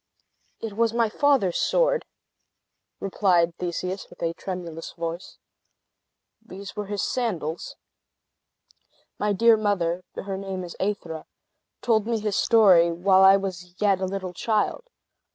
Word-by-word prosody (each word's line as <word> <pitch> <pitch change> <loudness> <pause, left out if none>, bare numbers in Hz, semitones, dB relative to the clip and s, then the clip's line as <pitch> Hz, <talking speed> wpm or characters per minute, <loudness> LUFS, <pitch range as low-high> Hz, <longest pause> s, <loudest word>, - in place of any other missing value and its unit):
"It 225 -2 -5
was 230 +1 +1
my 230 -2 +2
father's 260 -8 +2
sword," - - +2 0.9
replied 180 -4 +2
Theseus, 180 +2 -4
with - - -11
a 165 0 0
tremulous 170 -3 -6
voice. 170 +1 -6 1.1
"These 200 -2 -10
were 210 -1 -4
his 205 0 -2
sandals. 180 -10 -3 1.4
My 210 0 +1
dear 230 +3 +5
mother 185 -4 0
(her 195 -1 -4
name 190 -1 -5
is 175 - -8
Aethra) 175 -5 -3 0.6
told 220 -3 +2
me 230 -1 0
his 210 -2 -2
story 185 -7 +5
while 185 +3 +3
I 195 +1 +8
was 180 -2 -6
yet 200 -3 +2
a - - +1
little 190 -1 -4
child. 220 - -1
195 Hz, 130 wpm, -25 LUFS, 175-215 Hz, 1.4 s, I